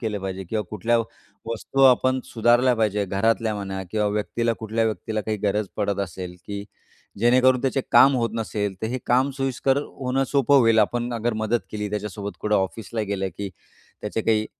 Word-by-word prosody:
केलं 110 -3 -2
पाहिजे 95 0 -5
किंवा 105 +4 -2
कुठल्या 115 +3 +1 0.5
वस्तू 125 +4 -1
आपण 130 0 +4
सुधारल्या 120 +2 +3
पाहिजे. 105 -2 +1
घरातल्या 110 +3 0
म्हणा 95 -1 -4
किंवा 105 -1 0
व्यक्तीला 110 +3 0
कुठल्या 110 +1 -1
व्यक्तीला 110 0 -2
काही 110 +1 -2
गरज 105 0 +1
पडत 100 -1 -1
असेल, 90 0 -8
की 100 0 -5 0.5
जेणेकरून 125 +2 +4
त्याचे 135 0 +1
काम 135 0 +7
होत 115 -2 0
नसेल 105 -3 -2
तर 110 - 0
हे 130 +3 -3
काम 130 +3 +3
सोयीस्कर 135 0 0
होणं 135 -1 -2
सोपं 140 0 +4
होईल 115 -2 +4
आपण 120 +3 +1
अगर 115 +1 -1
मदत 110 +2 0
केली 105 -1 -3
त्याच्यासोबत 105 -1 -4
कुठं 105 0 0
ऑफिसला 110 +4 -2
गेलं, 100 -2 -2
की 100 -1 -3 0.5
त्याचे 105 +2 -3
काही 110 -1 +2
110 Hz, 175 wpm, -24 LUFS, 105-120 Hz, 0.5 s, काम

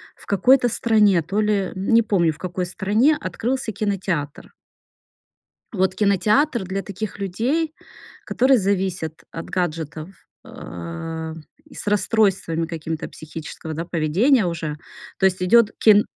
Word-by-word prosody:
в - - -18
какой-то 245 +5 +4
стране, 210 -6 +3
то 200 +6 -1
ли, 205 -2 0
не 225 +5 +3
помню, 175 -7 +2
в - - -17
какой 180 0 -3
стране, 220 - +2
открылся 230 +6 -2
кинотеатр. 185 -8 -3 1.2
Вот 190 -2 +1
кинотеатр 210 - +2
для 195 +2 -3
таких 200 +1 -6
людей, 260 - -1 0.5
которые 260 0 +3
зависят 185 -5 -2
от 165 - -6
гаджетов, 160 -1 -3 0.3
э, 160 - -7 0.3
и - - -17
с - - -8
расстройствами 200 -6 +1
какими-то 160 -1 -5
психического, 160 0 -8
да, 165 +2 -3
поведения 185 - +2
уже. 160 -3 -3 0.4
То 190 - 0
есть 185 -1 0
идёт 220 +3 +5
кин 210 -1 +6
190 Hz, 125 wpm, -22 LUFS, 165-215 Hz, 1.2 s, кин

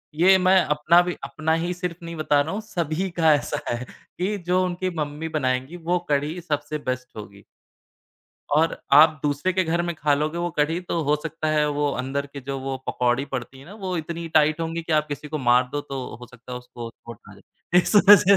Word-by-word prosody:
ये 185 +4 +6
मैं 185 +1 +5
अपना 150 +4 +4
भी 180 0 -3
अपना 160 +1 -1
ही 175 +1 -1
सिर्फ़ 180 -2 -4
नहीं 170 0 -6
बता 155 -2 +2
रहा 155 +3 -3
हूँ, 210 - -3
सभी 180 -3 -2
का 165 -2 +4
ऐसा 145 - -1
है 120 +1 -3 0.3
कि 195 +4 -1
जो 180 +1 +3
उनकी 180 +1 -2
मम्मी 150 +1 -3
बनाएँगी, 130 +1 -1
वो 175 +1 0
कढ़ी 145 +4 0
सबसे 150 -2 -3
बेस्ट 130 0 -3
होगी। 100 -1 -10 1.1
और 160 +3 +3 0.2
आप 155 +2 +7
दूसरे 145 +5 0
के 185 0 +1
घर 170 +1 0
में 175 0 -2
ख़ा 150 -2 +2
लोगे 155 +3 -1
वो 175 0 -1
कढ़ी 160 +4 +1
तो 170 -2 -2
हो 150 0 +2
सकता 160 -1 -3
है 150 -1 +2
वो 145 -1 +1
अंदर 135 +2 -2
के 140 - -7
जो 135 +1 -4
वो 135 0 -3
पकौड़ी 125 +2 +1
पड़ती 135 -1 -6
हैं 135 - -14
ना, 195 - -11
वो 190 -4 -4
इतनी 165 +1 -4
टाइट 155 +1 +4
होंगी 165 0 -3
कि 165 - -3
आप 155 0 +3
किसी 150 +1 -6
को 155 +1 -3
मार 125 -1 +3
दो 145 - -1
तो 135 -3 -6 0.2
हो 125 - -9
सकता 125 +1 -13
है 125 - -4
उसको 120 -1 -9
चोट 115 -1 -12
आ - - -13
जाए। 170 - -1
इस 180 - -2
वजह 200 -1 +8
155 Hz, 220 wpm, -24 LUFS, 140-175 Hz, 1.1 s, वजह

